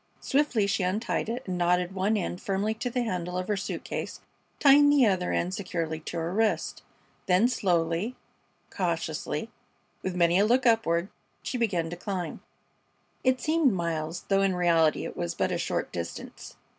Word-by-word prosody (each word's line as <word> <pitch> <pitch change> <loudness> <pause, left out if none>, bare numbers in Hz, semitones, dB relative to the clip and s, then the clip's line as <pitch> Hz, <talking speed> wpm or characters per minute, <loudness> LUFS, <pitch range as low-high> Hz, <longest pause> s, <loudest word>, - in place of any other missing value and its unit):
Swiftly 265 -7 +1
she 200 0 0
untied 210 +5 -1
it 245 +3 -3
and 180 -1 -3
knotted 180 +1 +2
one 200 +3 +1
end 180 -2 -3
firmly 200 +2 0
to 225 +3 -3
the 245 0 -1
handle 180 -5 -3
of 185 0 -3
her 210 - +1
suit 195 - -4
case, - - -5 0.4
tying 290 +1 +7
the 285 -3 +5
other 185 -4 +1
end 180 +2 0
securely 170 -6 -3
to 165 +2 -6
her 165 +2 -2
wrist. 220 +1 0 0.5
Then 185 +5 +5
slowly, 175 0 0 0.6
cautiously, - - -2 0.5
with 185 -1 -3
many 175 +1 +4
a 205 - +5
look 255 +3 +3
upward, 200 -6 +2 0.3
she - - -4
began 175 -8 0
to - - -4
climb. 180 -1 -4 0.8
It 255 0 +3
seemed 310 -6 +2
miles, 170 -1 -2
though 195 0 +3
in 195 -2 +2
reality 165 -3 +3
it - - -6
was 85 - -3
but - - 0
a - - -1
short - - -2
distance. 85 -1 -7
190 Hz, 170 wpm, -28 LUFS, 175-225 Hz, 0.8 s, tying